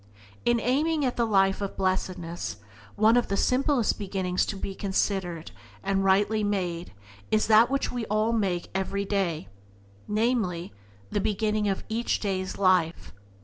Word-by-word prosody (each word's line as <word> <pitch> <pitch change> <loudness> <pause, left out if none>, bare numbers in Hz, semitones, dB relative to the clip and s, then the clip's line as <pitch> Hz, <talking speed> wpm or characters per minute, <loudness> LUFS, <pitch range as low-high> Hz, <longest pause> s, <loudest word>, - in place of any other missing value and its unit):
In 240 0 +3
aiming 295 +6 +1
at 250 - -1
the 235 -1 +1
life 195 -2 +3
of 200 - -4
Blessedness 180 - -2 0.4
one 220 +2 +5
of 245 - +2
the 200 - -1
simplest 255 -2 +2
beginnings 190 -2 -1
to - - -3
be 195 0 -5
considered 190 - -2 0.3
and 195 +6 +1
rightly 205 +3 +3
made 180 -4 -2 0.4
is 215 - +2
that 220 +2 +6
which 275 0 -1
we 240 -3 -3
all 215 +2 +1
make 190 -6 -1
everyday 190 - -1 0.3
— 100 - -28 0.2
namely, 210 - 0 0.4
the 205 - 0
beginning 210 +1 0
of 195 - -2
each 230 +2 -1
day's 190 -2 -2
life. 185 -4 +2
200 Hz, 145 wpm, -27 LUFS, 185-220 Hz, 0.4 s, that